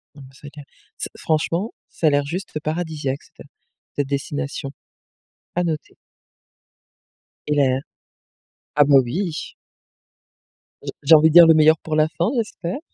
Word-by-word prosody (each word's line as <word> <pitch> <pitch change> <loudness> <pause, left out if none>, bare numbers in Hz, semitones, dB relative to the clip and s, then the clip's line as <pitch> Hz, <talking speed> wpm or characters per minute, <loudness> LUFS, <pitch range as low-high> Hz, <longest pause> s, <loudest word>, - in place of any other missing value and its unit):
Non, 145 - -13
mais 130 - -20
c'est 145 +1 -12
clair. 145 -1 -13 0.3
C'est - - -5
franchement, 165 +6 -1 0.2
ça 160 - -1
a - - +6
l'air 145 0 +1
juste 180 +7 -5
f 155 - -4
paradisiaque, 155 -4 -3
c'était - - -17 0.5
cette 145 -1 -1
destination. 140 0 -4 0.9
À 175 - +2
noter. 155 -3 -4 1.5
Et 150 - 0
là 135 -2 +2 1.0
ah 145 - +6
bah, 140 -1 +4
oui! 165 +6 -4 1.3
J'ai - - -5
j'ai 145 +3 +5
envie 155 +1 +5
de 160 - -3
dire: 170 -1 +10
le 160 - +7
meilleur 155 0 +5
pour 155 -1 -4
la 155 0 +3
fin, 170 +2 -2
j'espère. 215 -2 -3
155 Hz, 155 wpm, -21 LUFS, 145-165 Hz, 1.5 s, dire